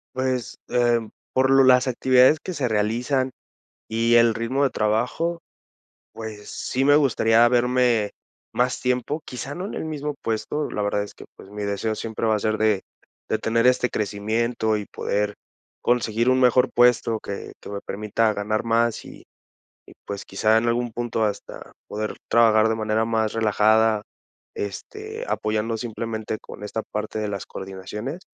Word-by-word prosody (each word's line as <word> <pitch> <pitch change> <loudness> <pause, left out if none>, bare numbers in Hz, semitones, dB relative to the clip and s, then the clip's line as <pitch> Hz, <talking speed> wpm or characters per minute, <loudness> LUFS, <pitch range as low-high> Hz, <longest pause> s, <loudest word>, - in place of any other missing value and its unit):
Pues, 130 -3 -2
eh, 120 -1 +3 0.3
por 130 0 +3
lo 135 0 +6
las 130 0 +5
actividades 130 +3 +5
que 185 - -6
se 135 -7 -1
realizan 120 +5 0 0.6
y 115 +1 +2
el 115 -1 +6
ritmo 115 +5 -1
de 140 - +3
trabajo, 125 +12 0 0.7
pues, 110 -2 -8
sí 130 - -2
me 145 +1 +6
gustaría 120 -5 +4
verme 125 -3 +2 0.4
más 125 +1 0
tiempo, 125 +5 -1
quizá 130 +3 -6
no 180 +5 -5
en - - -6
el - - -4
mismo 150 -2 -4
puesto, 115 +7 -2
la 105 - -2
verdad 105 0 0
es 100 - -10
que, - - -13
pues, 95 - -14
mi 105 0 -6
deseo 100 +2 -1
siempre 110 +1 -4
va 110 - +3
a - - -1
ser 110 +1 0
de 110 -3 +2 0.5
de - - +1
tener 115 +1 +1
este 125 0 +3
crecimiento 110 +2 -1
y 105 - -5
poder 105 +1 -2 0.5
conseguir 120 0 +1
un 130 - +3
mejor 125 0 +4
puesto 120 -2 +3
que 100 -1 -7
que - - -10
me 100 0 -5
permita 105 +2 0
ganar 105 +1 -1
más, 115 0 +1
y - - -12 0.7
y, - - -13
pues, 100 -1 -6
quizá 110 +3 +2
en 115 +1 +2
algún 120 0 0
punto 115 -1 -1
hasta 100 -1 -5 0.2
poder 105 +1 -4
trabajar 110 -2 +5
de 110 - 0
manera 110 0 0
más 110 -1 0
relajada, 110 0 +3 0.5
este, 430 - -6
apoyando 110 +1 -1
simplemente 110 -2 -4
con - - -11
esta 110 +2 -3
parte 105 +1 -3
de 105 - -1
las 100 -2 -4
coordinaciones. 105 - -6
115 Hz, 165 wpm, -23 LUFS, 110-125 Hz, 0.7 s, lo